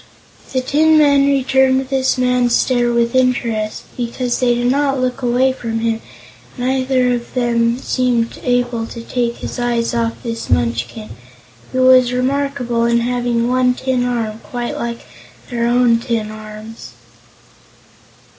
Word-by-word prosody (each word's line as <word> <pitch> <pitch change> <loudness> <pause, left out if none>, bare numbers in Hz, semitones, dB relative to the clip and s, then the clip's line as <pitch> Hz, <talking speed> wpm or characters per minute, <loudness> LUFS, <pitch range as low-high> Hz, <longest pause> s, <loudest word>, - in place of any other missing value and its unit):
The 260 - 0
tin 310 +4 +3
men 280 -2 +4
returned 265 -1 +2
this 265 -1 +1
man's 250 -1 +2
stare 245 -2 +2
with 235 0 +1
interest, 235 -4 0
but 235 -1 -4
they 245 -1 +1
did 245 +1 +1
not 275 -1 +1
look 255 +1 -2
away 250 +2 +2
from 230 -3 -4
him 225 -1 0
because - - -21
neither 255 0 +1
of 240 +1 -5
them 235 -1 +1
seemed 250 -3 -1
able 245 -2 0
to 230 - -8
take 235 -1 -2
his - - -7
eyes 240 -1 0
off 230 +1 -2
this 230 -1 -5
Munchkin, 115 -2 -1 0.6
who 255 0 +1
was 255 -1 +5
remarkable 255 -2 -1
in 235 0 +2
having 240 -1 0
one 250 0 +2
tin 260 -1 -1
arm 230 -3 -2
quite 240 0 -5
like 235 0 -4 0.5
their 235 -1 0
own 240 -1 +3
tin 230 -3 -2
arms. 215 +1 -10
245 Hz, 145 wpm, -17 LUFS, 235-255 Hz, 0.6 s, was